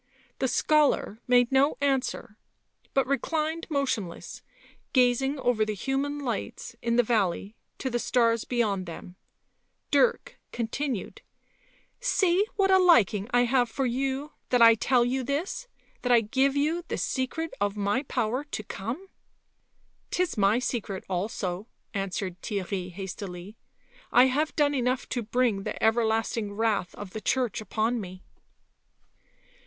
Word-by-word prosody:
The 260 - +1
scholar 280 -4 +2
made 245 0 +4
no 270 +2 +3
answer, 270 -6 -1 0.6
but 270 -2 +3
reclined 315 +4 -1
motionless,' 255 - -2 0.5
gazing 260 +2 +3
over 245 -4 +1
the 215 0 -2
human 275 +6 -1
lights 235 -4 -4
in 235 0 0
the 245 - +5
valley 205 -2 0 0.2
to - - -4
the 240 -2 -1
stars 230 -2 +2
beyond 205 -7 -1
them; 175 +2 -9 0.8
Dirk - - +2
continued: 240 0 -3 0.4
" - - -34 0.3
See 395 -5 +2
what 390 -1 +3
a 380 - +7
liking 225 - +4
I 245 -1 +3
have 245 0 +2
for 270 +3 -1
you 270 +4 -1 0.2
that 250 - +3
I 230 -1 +9
tell 240 +2 +2
you 260 +2 -1
this 310 - -3 0.2
— - - -36
that 250 - 0
I 235 -1 +6
give 265 +5 +1
you 310 +5 +1
the - - -3
secret 295 +5 -2
of 205 0 0
my 205 +5 +1
power 250 -1 -1
to 285 -7 -5
come... 230 - -5 0.5
" - - -42
'Tis 360 -1 0
my 205 +1 +3
secret 225 -6 -3
also," 185 +1 -3 0.3
answered 195 -2 -3
Theirry 190 -3 -3
hastily. 190 +1 -7 0.3
" - - -28
I - - +7
have 290 +4 0
done 290 -2 +3
enough 255 0 0
to 245 - -1
bring 230 -2 +1
the - - -4
everlasting 220 -1 +1
wrath 210 -4 0
of 205 -2 -8
the 220 - -6
Church 250 -4 0
upon 225 +2 -1
me." 185 -1 -9
245 Hz, 145 wpm, -27 LUFS, 210-275 Hz, 0.8 s, I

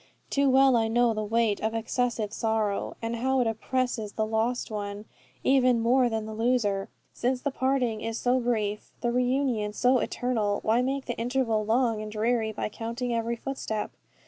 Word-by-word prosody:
Too 280 -1 +3
well 265 0 +5
I 225 -1 +2
know 235 +1 +3
the 215 0 -2
weight 220 -1 +1
of 220 +1 -1
excessive 225 -2 -1
sorrow, 220 -3 -1
and 230 +1 -2
how 265 +3 +1
it 250 - +2
oppresses 225 -1 -1
the 220 - 0
lost 225 +3 -1
one, 205 0 -5 0.4
even 255 -3 +4
more 245 +2 +3
than 220 -1 -2
the 220 - -6
loser. 220 -4 0 0.2
Since 250 +1 -1
the 285 - -1
parting 260 -5 0
is 225 0 -3
so 250 +2 +2
brief, 215 -4 -1
the 240 - +1
reunion 250 -4 0
so 250 +3 +3
eternal, 220 -6 -1
why 225 +3 +3
make 270 +1 -1
the 240 - -3
interval 235 -2 0
long 230 -1 +2
and 215 0 -6
dreary 220 +1 0
by 210 - -3
counting 235 +3 -4
every 230 0 -1
footstep? 230 -4 -4
230 Hz, 175 wpm, -27 LUFS, 220-250 Hz, 0.4 s, well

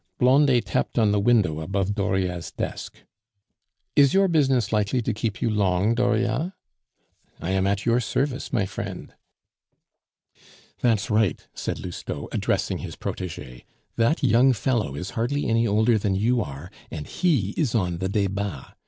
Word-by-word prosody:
Blondet 130 -1 +4
tapped - - -2
on 110 -3 +4
the 105 - +2
window 100 -8 +2
above 95 +4 -1
Dauriat's 95 -4 -1
desk. - - -6 0.9
"Is 140 +1 +5
your 195 0 +5
business 135 - +2
likely 105 +4 +1
to 115 - -1
keep 110 -1 -3
you - - +2
long, 100 0 +2
Dauriat?" 125 - 0 0.9
"I 90 - -3
am 95 0 +1
at 100 0 -1
your 120 +1 +3
service, 130 +3 -2
my 115 -7 +1
friend." - - -7 1.7
"That's 115 -2 +1
right," 105 -3 +1
said - - -4
Lousteau, 90 -2 -6
addressing - - -1
his - - -7
protege. 75 -9 -6 0.3
"That 120 +7 +1
young 130 +1 +5
fellow 110 - -1
is 90 +6 -5
hardly 130 +6 -1
any 115 0 +2
older 110 +2 +3
than 100 -1 0
you 115 +5 +2
are, 70 -7 -7 0.2
and 75 - -6
he 140 - 0
is 140 -9 0
on 90 -5 0
the 95 0 -1
Debats! 100 -6 -2
110 Hz, 150 wpm, -24 LUFS, 95-125 Hz, 1.7 s, Is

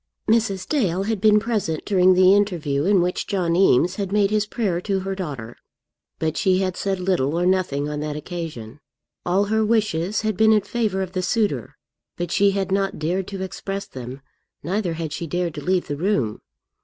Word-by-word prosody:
Mrs. 215 -4 +1
Dale 195 - 0
had 215 -1 -2
been 210 -1 +5
present 205 -9 -2
during 185 -2 +4
the 185 +1 +6
interview 170 -8 +1
in 195 -1 +4
which 180 +1 -2
John 175 -4 0
Eames 180 0 +3
had 200 -2 -3
made 205 -1 +2
his 215 0 +1
prayer 195 -7 -1
to 195 0 -1
her 195 +1 -3
daughter, 140 - -6 0.6
but 160 -1 -2
she 185 -1 +3
had 185 -1 -1
said 195 -1 -2
little 170 -4 0
or 175 - +1
nothing 180 -6 +1
on 150 0 -4
that 150 0 -3
occasion. 150 -7 -7 0.5
All 185 +3 +3
her 220 +2 +1
wishes 210 -4 0
had 215 -2 -1
been 220 +2 +5
in 210 - +4
favour 210 -4 -1
of 185 - -6
the 185 -1 -2
suitor, 185 - -1 0.4
but 175 -1 -3
she 200 +1 +4
had 195 -1 -2
not 195 0 0
dared 180 +5 -1
to 195 -1 -5
express 195 +1 -5
them, 130 +1 -8 0.4
neither 180 +2 -1
had 160 -2 -4
she 170 - -4
dared 175 0 -2
to - - -6
leave 185 -1 +1
the 145 - -3
room. 150 - 0
185 Hz, 195 wpm, -22 LUFS, 165-200 Hz, 0.6 s, the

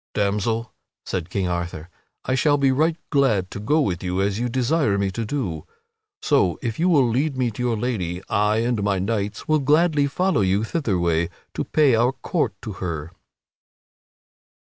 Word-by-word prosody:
"Damsel," 105 +3 -1 0.3
said 90 -4 -3
King 95 -2 -1
Arthur, 85 -2 -3 0.4
"I 130 - 0
shall 145 +2 +3
be 135 -1 +3
right 155 +5 +1
glad 110 -10 +2
to - - -6
go 145 +10 +1
with 90 - -1
you 90 +1 -1
as 100 +1 0
you 120 +1 -1
desire 130 -2 +1
me 100 -1 0
to 115 +3 -3
do. 100 - -3 0.6
So, 90 -2 +2
if 115 +1 -3
you 175 +2 +3
will 140 -7 +4
lead 135 +4 0
me 125 -2 +1
to 110 - -7
your 120 -2 0
lady, 95 -7 -2
I 105 +1 +1
and 120 -3 0
my 100 -1 +1
knights 100 +1 -2
will 155 0 +3
gladly 150 +1 +3
follow 180 - +1
you 95 +2 +2
thitherway 85 - 0 0.2
to - - -3
pay 150 -4 +3
our 120 +3 +3
court 150 +4 -2
unto 105 -6 -7
her." 80 -3 -4
110 Hz, 175 wpm, -23 LUFS, 95-135 Hz, 0.6 s, will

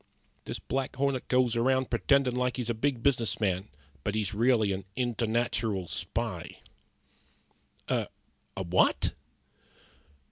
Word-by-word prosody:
This - - -4
Black 135 -1 -3
Hornet 135 -1 0
goes 125 -2 +3
around 130 +2 +2
pretendin' 130 +1 +3
like 125 -1 0
he's 120 -2 -1
a - - 0
big 120 +1 -1
business 120 -7 +2
man, 95 -1 0 0.3
but 105 - -1
he's 105 -3 -1
really 110 -2 +3
a 95 0 -3
internatural 115 -5 0
spy." - - -3 1.3
"A - - 0 0.5
what?" 90 -1 +2
120 Hz, 115 wpm, -29 LUFS, 105-130 Hz, 1.3 s, goes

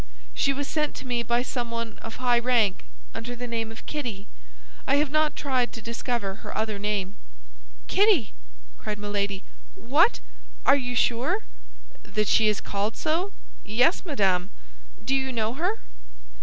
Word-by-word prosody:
"She 275 - +2
was 280 +1 -2
sent 300 -1 0
to - - -7
me 245 -2 0
by 235 +1 +1
someone 230 -3 -3
of 225 - -7
high 245 -1 +3
rank, 235 - +2 0.3
under 245 +2 -5
the 245 +1 -5
name 225 -2 -2
of 225 - -11
Kitty. 240 -10 -4 0.6
I 275 - +4
have 290 -1 +2
not 310 0 +2
tried 255 -4 0
to - - -6
discover 230 -3 -3
her - - -6
other 215 -1 -1
name." 200 -2 -1 0.7
"Kitty!" 390 - +4 0.5
cried 210 - -3
Milady. 200 -1 -2 0.3
"What? - - +3 0.5
Are - - +7
you 245 -3 -2
sure?" 240 - +2 0.6
"That 210 - -1
she 220 - +5
is 210 -1 +1
called 205 +2 -2
so? 340 +6 0 0.3
Yes, 245 - +3
madame. 195 - +1 0.6
Do 270 - +1
you 265 -1 +1
know 225 -2 0
her?" 360 - 0
235 Hz, 155 wpm, -26 LUFS, 210-270 Hz, 0.7 s, Are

